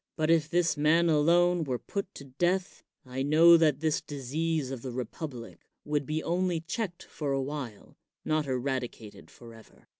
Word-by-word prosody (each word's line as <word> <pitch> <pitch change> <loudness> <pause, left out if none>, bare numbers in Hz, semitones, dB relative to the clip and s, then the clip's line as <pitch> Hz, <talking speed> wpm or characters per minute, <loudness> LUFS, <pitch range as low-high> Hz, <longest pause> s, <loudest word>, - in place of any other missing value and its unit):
But 155 0 +1
if 160 -2 +3
this 175 0 +2
man 160 +3 +3
alone 170 +3 +3
were 130 -4 -2
put 200 +8 -5
to - - -9
death, 175 +8 -1 0.2
I 130 +1 -5
know 160 +4 +7
that 155 -4 +3
this 155 -2 +1
disease 145 +1 -2
of 130 -3 -5
the 130 - -5
republic 125 0 -6 0.3
would 145 -2 -1
be 155 +1 -2
only 175 0 0
checked 175 +2 -4
for 145 -3 -4
a 135 - 0
while, 130 -7 -7 0.3
not 155 -2 0
eradicated 125 -4 -4
forever. 115 -2 -15
150 Hz, 160 wpm, -29 LUFS, 130-165 Hz, 0.3 s, know